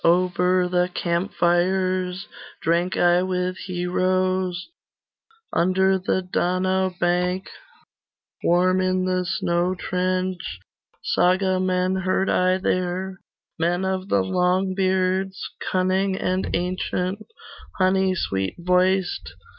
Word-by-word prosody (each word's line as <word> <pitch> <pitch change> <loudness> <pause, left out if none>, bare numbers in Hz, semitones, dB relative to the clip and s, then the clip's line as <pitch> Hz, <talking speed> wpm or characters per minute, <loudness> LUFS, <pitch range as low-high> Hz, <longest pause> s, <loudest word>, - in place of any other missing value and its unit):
Over 180 +1 +3
the 180 0 +1
camp 175 +3 -1
fires 185 +2 0 0.3
Drank 170 +3 0
I 175 0 +4
with 185 0 -1
heroes, 185 - 0 0.8
Under 190 +2 +2
the 185 0 -1
Donau 185 +1 0
bank 180 +2 0 1.0
Warm 185 +2 +3
in 185 0 +1
the 185 0 0
snow 175 -1 0
trench, 185 - -2 0.5
Sagamen 185 0 +1
heard 190 +1 +1
I 185 0 +2
there, 185 0 -2 0.4
Men 175 +3 0
of 190 0 -2
the 95 - +2
Longbeards, 185 - +1 0.3
Cunning 190 +1 +1
and 185 0 -1
ancient, 185 +2 -2 0.5
Honey 190 0 +2
sweet 95 - -2
voiced. 180 - +1
185 Hz, 95 wpm, -23 LUFS, 180-185 Hz, 1.0 s, I